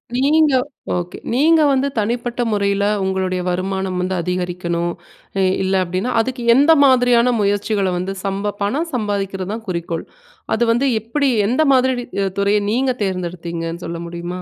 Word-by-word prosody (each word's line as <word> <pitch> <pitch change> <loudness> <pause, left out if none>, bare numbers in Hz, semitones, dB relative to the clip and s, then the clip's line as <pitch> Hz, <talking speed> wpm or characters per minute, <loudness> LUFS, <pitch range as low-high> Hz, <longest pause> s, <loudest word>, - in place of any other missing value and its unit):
நீங்க 295 +3 +3 0.4
ஓகே. 175 0 -4 0.2
நீங்க 315 +5 +4
வந்து 270 0 +1
தனிப்பட்ட 240 +3 -2
முறைல 200 -1 +1 0.2
உங்களுடைய 190 -1 -1
வருமானம் 185 0 -2
வந்து 185 +1 -1
அதிகரிக்கனும், 175 -1 -2 0.5
இ - - +3 0.2
இல்ல 190 0 0
அப்படின்னா, 185 +7 -2
அதுக்கு 250 +2 -2
எந்த 285 +5 +5
மாதிரியான 245 -2 +4
முயற்சிகள 200 -1 0
வந்து 185 +2 -3
சம்ப 200 +1 -2
பணம் 280 +12 -1
சம்பாதிக்கிறது 200 -4 -2
தான் 225 0 -7
குறிக்கோள், 170 -2 -3 0.5
அது 230 - +1
வந்து 245 +4 +2
எப்புடி, 275 +6 0 0.2
எந்த 255 +8 +2
மாதிரி 260 0 +3
நீ - - -8 0.2
அ - - +1
துறைய 200 +1 +3
நீங்க 255 +3 +1
தேர்ந்தெடுத்தீங்கன்னு 170 -2 -4
சொல்ல 170 0 -5
முடியுமா? 175 +1 -6
200 Hz, 145 wpm, -19 LUFS, 180-245 Hz, 0.5 s, எந்த